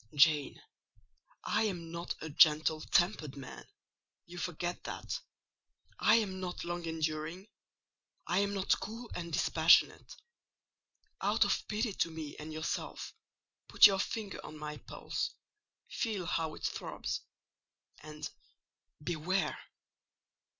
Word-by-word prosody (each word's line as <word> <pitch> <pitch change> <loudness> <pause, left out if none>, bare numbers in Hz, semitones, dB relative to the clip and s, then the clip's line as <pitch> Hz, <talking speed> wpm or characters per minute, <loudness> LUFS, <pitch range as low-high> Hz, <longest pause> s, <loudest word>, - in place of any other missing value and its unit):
"Jane, 145 -1 +4 0.8
I 220 - +1
am 170 -5 -3
not 170 +1 -4
a 160 - -5
gentle 155 0 +5
tempered 160 -7 +1
man—you 170 +5 -13
forget 175 0 -3
that: - - -4 0.8
I 215 - +6
am 200 -5 +1
not 180 -1 -4
long 175 0 -3
enduring; 160 +4 -3 0.8
I 180 - +2
am 200 0 +1
not 195 -1 +2
cool 230 +3 -7
and 170 -1 -5
dispassionate. - - +4 1.1
Out - - +3
of - - 0
pity 215 0 -1
to 170 - 0
me 160 -3 -6
and 155 +1 -7
yourself, 155 +1 -4 0.5
put - - +8
your 195 -2 +7
finger 205 0 -3
on 155 - -9
my 150 0 -5
pulse, - - -4 0.5
feel 210 -6 -2
how 160 -2 -1
it - - -13
throbs, - - -3 0.8
and—beware!" 155 +3 -4
170 Hz, 115 wpm, -33 LUFS, 155-190 Hz, 1.1 s, put